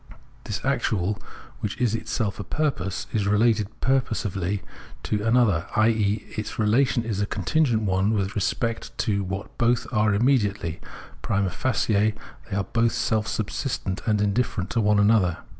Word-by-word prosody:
This - - -4
actual, 100 0 0 0.4
which 105 +4 -4
is 120 -4 +2
itself 110 -2 -2
a - - -3
purpose, 120 - -2
is 105 -2 +1
related 105 0 +3
purposively 105 -7 0 0.4
to 105 -1 -1
an 115 +3 +3
other, 100 -9 +2
i.e. 110 -1 +2
its 110 - -4
relation 115 +3 +2
is 110 -3 -2
a 100 - 0
contingent 115 - +1
one 95 0 +1
with 100 -1 0
respect 115 +3 -2
to 100 -4 0
what 95 +1 -5
both 120 0 +2
are 105 -2 +3
immediately; 105 - +1 0.4
prima 100 -2 0
facie 110 -2 +1 0.3
they 95 - -3
are 100 - +1
both 115 +2 +1
self 110 -1 0
subsistent 110 -3 -2
and 105 -2 +2
indifferent 105 -2 0
to 115 - +1
one 105 0 +3
another. 100 -4 +3
105 Hz, 150 wpm, -25 LUFS, 100-115 Hz, 0.4 s, related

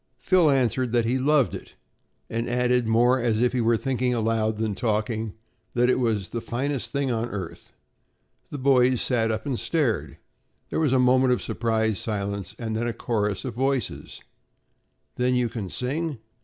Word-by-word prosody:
Phil 180 -4 +3
answered 130 -2 +1
that 120 -2 +3
he 125 +3 +1
loved 140 -1 +3
it - - -9 0.5
and 115 +1 -3
added 125 -1 +1
more 120 +3 +4
as 115 -3 +1
if 125 +1 +2
he 125 - +1
were 115 0 +3
thinking 125 0 0
aloud 110 -1 0
than 110 -1 -1
talking, 110 0 -2 0.4
that 125 +1 +3
it - - +1
was 110 -6 -1
"the 115 - -3
finest 120 +1 -3
thing 140 -1 0
on 115 +1 -1
earth." 95 -5 -7 0.8
The 145 - -5
boys 130 -2 +3
sat 115 -3 +1
up 110 0 -3
and 130 -4 -2
stared. 110 - -1 0.5
There - - 0
was 155 -5 +2
a 130 - +4
moment 130 0 +4
of 125 - -1
surprised 110 -3 0
silence 100 -2 -3
and 110 -2 -3
then 115 +2 -1
a 120 - -2
chorus 105 -4 -2
of 125 - -4
voices: 130 -1 -2 0.9
"Then 125 0 +2
you 125 -1 +1
can 105 -5 -5
sing?" 145 - -2
120 Hz, 175 wpm, -25 LUFS, 110-130 Hz, 0.9 s, more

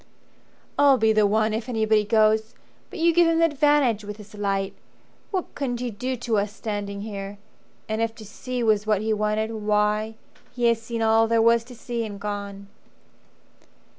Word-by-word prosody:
"I'll 280 -2 +6
be 220 -1 +3
the 215 -1 +4
one, 215 +1 +1
if 225 +3 -3
anybody 220 -2 +2
goes! 220 +1 +2 0.3
But - - -9
you 335 0 +3
give 345 0 +5
him 330 0 +2
the 330 - +5
advantage 290 -7 +2
with 210 0 -7
this 210 0 -13
light. 195 -2 -2 0.6
What 375 -3 -3
couldn't 245 -4 -3
he 245 -1 -3
do 250 +5 -3
to 230 -3 0
us 205 0 -2
standing 205 -2 -5
here! 200 -1 -6 0.5
And 220 +1 -2
if 225 0 -1
to 220 - -11
see 250 +4 -5
was 215 -1 +2
what 210 -2 +2
he 220 0 0
wanted, 215 +1 -1
why 210 0 0 0.4
He 245 - -4
has 230 -1 +1
seen 230 0 -3
all 225 0 +4
there 230 0 +2
was 230 0 +4
to 250 0 -12
see 235 0 -4
and 205 -2 -7
gone." 200 -1 -5
220 Hz, 185 wpm, -24 LUFS, 210-235 Hz, 0.6 s, I'll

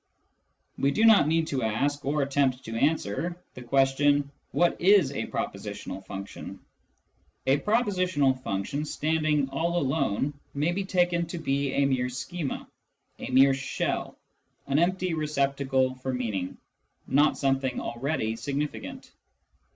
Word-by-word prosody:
We 140 - +3
do 220 +10 +2
not 220 -9 +7
need 165 +1 +2
to 135 -2 -1
ask, 140 +6 0
or 145 +1 +1
attempt 135 -2 0
to 115 - -5
answer, 155 - 0 0.2
the 125 - -10
question: 140 +3 +2
" - - -44
What 175 0 +2
is 185 -6 +5
a 140 - -3
propositional 95 +1 -5
function? 100 0 -7 0.4
" - - -42
A - - -2
propositional 185 - +1
function 100 +8 -2
standing 155 -1 0
all 170 +6 -1
alone 140 -3 0 0.2
may 150 +4 +1
be 195 +2 -2
taken 175 -2 +1
to 175 - -5
be 140 -3 -1
a 140 - +3
mere 130 -2 +1
schema, 145 +4 -4 0.5
a - - -5
mere 135 +1 +6
shell, 135 0 -3 0.5
an 140 +2 +1
empty 185 +1 +1
receptacle 140 -4 0
for 130 0 -4
meaning, 110 -8 -3 0.5
not 145 +3 +3
something 135 -2 0
already 120 -2 -2
significant. 145 +4 -4
140 Hz, 135 wpm, -27 LUFS, 130-160 Hz, 0.5 s, not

